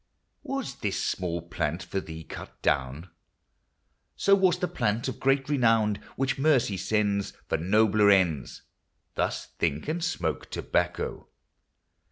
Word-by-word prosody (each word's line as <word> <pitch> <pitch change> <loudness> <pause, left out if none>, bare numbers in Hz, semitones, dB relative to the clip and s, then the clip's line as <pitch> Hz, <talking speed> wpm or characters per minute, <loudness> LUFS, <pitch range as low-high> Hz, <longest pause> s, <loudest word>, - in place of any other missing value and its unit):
Was 275 -1 -4
this 100 -2 -2
small 85 -3 -2
plant 85 +1 -2
for 95 - -3
thee 80 -3 -8
cut - - -10
down? 70 +6 0 1.0
So 200 - +3
was 190 -3 +4
the 180 - -1
plant 115 -8 -1
of 130 - -4
great 135 +1 +2
renown, 115 -7 +3 0.2
Which 135 0 -1
Mercy 135 -8 +3
sends 100 0 0
For - - 0
nobler 105 +3 +4
ends. 90 -9 +2 0.5
Thus - - -1
think, 75 - 0
and 165 +2 -2
smoke 180 - -2
tobacco. - - -2
105 Hz, 130 wpm, -27 LUFS, 90-135 Hz, 1.0 s, was